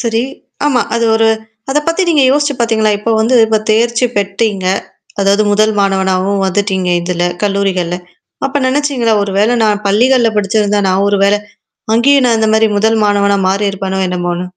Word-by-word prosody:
சரி, 230 -1 -1 0.4
ஆமா, 265 -4 +2
அது 230 0 0
ஒரு 225 0 +2 0.4
அத 295 - +2
பத்தி 330 +3 0
நீங்க 305 -4 +3
யோசிச்சு 290 +1 +1
பார்த்தீங்களா? 220 -2 +1
இப்போ 220 +2 -3
வந்து 235 +4 +1
இப்ப 220 0 +1
தேர்ச்சி 235 +2 +1
பெற்றீங்க. 200 -1 -1 0.6
அதாவது 200 +2 +2
முதல் 215 +1 +2
மாணவனாவும் 195 0 0
வந்துட்டீங்க 190 -1 -1
இதுல, 175 0 -2 0.2
கல்லூரிகள்ல. 195 -3 -1 0.5
அப்ப 275 +1 -4
நெனச்சீங்களா, 260 -4 0
ஒரு 200 -1 -3
வேள 210 +3 +2
நான் 210 -1 0
பள்ளிகள்ல 235 +4 +3
படிச்சிருந்தா 210 0 0
நான் 190 +1 +1
ஒரு 200 0 +1
வேளை, 205 +1 +2 0.6
அங்கேயும் 265 +3 +3
நான் 230 -2 +2
இந்த 220 0 +1
மாரி 220 0 +3
முதல் 220 +2 +1
மாணவனா 200 -1 +1
மாறியிருப்பனோ, 195 -1 -2
என்னமோன்னு? 175 -1 -3
210 Hz, 155 wpm, -13 LUFS, 195-230 Hz, 0.6 s, நீங்க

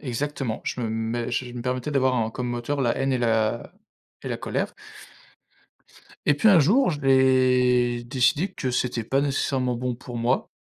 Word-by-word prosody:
Exactement. 135 -2 -3
Je 125 - -3
me 115 - -2
mets 115 +2 -2
j 125 +1 -2
je - - -10
me 120 - -5
permettais 125 +3 -2
d'avoir 130 -2 +2
un 110 -1 0
comme 125 +1 -4
moteur, 120 +4 -3
la 120 -3 +1
haine 135 0 0
et 130 - +1
la 115 -1 0 0.5
et - - -5
la - - -2
colère. - - -3 1.5
Et 150 - +5
puis 220 +10 +3
un 180 -5 +7
jour, 220 - +3
je 145 - -5
vais 125 -2 +3
décider 145 +9 +1
que 130 -7 -3
c'était 125 -1 -1
pas 135 +5 0
nécessairement 135 -3 0
bon 125 0 -3
pour 120 0 -9
moi, 120 +3 0
125 Hz, 185 wpm, -24 LUFS, 120-135 Hz, 1.5 s, un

